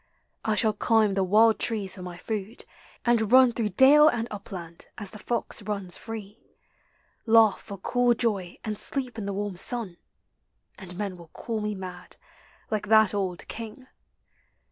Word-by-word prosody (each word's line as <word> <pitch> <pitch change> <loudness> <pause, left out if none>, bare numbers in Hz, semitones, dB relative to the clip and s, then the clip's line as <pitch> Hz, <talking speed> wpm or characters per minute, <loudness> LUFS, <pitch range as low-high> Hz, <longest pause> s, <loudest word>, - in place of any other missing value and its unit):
I 220 -1 +1
shall 215 0 +2
climb 220 0 +2
The 195 0 +1
wild 215 +4 +4
trees 210 -5 -1
for 185 - -8
my 180 -1 -7
food, 215 +2 -5 0.4
and 230 -3 +2
run 255 -1 +7
Through 225 -2 -2
dale 295 +3 +8
and 235 -5 +1
upland 180 -5 -8
as 205 -3 -7
the 210 - -10
fox 235 0 -2
runs 200 -3 -4
free, 220 -1 -8 0.9
Laugh 225 -2 +5
for 200 -2 -8
cool 245 +5 +2
joy 200 -7 -2
and 215 -1 -4
sleep 260 -3 -2
T - - -4
the 200 0 -3
warm 200 -1 -4
sun, 210 -3 -1 0.8
And 180 -2 -9
men 200 -3 -4
will 170 -1 -13
call 220 +6 -5
me 210 0 -2
mad, 180 -2 -9 0.5
like 210 -1 -2
that 220 -1 +5
old 190 -3 -3
King. 230 +2 -8
210 Hz, 165 wpm, -26 LUFS, 195-230 Hz, 0.9 s, dale